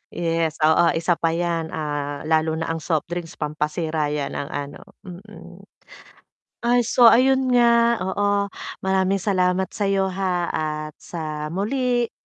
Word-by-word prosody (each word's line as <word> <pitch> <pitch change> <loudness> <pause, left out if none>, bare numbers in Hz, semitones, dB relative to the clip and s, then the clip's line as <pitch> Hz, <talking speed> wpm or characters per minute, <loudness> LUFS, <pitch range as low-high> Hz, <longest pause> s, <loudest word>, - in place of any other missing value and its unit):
Yes, 165 -2 -1
oo 160 +2 +5
isa 170 +1 0
pa 165 0 +1
yan, 170 -1 -1
ah, 145 -2 -4
lalo 160 0 +1
na 165 0 -3
ang 165 - -3
soft 160 0 -2
drinks 175 -1 -5
pampasira 150 +1 -2
'yan 145 -1 -3
ng 140 - -4
ano 145 0 -6 0.2
mm. 195 +3 -12 1.0
Ay, 245 +1 +3
so 240 +1 +6
ayun 260 +2 +4
nga 235 -1 +4
oo, 200 +1 0 0.3
maraming 190 0 +1
salamat 185 -1 +1
sa'yo, 195 -2 0
ha, 180 -2 -1
at 155 -1 -3
sa 155 -2 -5
muli, 240 - -1
175 Hz, 135 wpm, -22 LUFS, 155-205 Hz, 1.0 s, so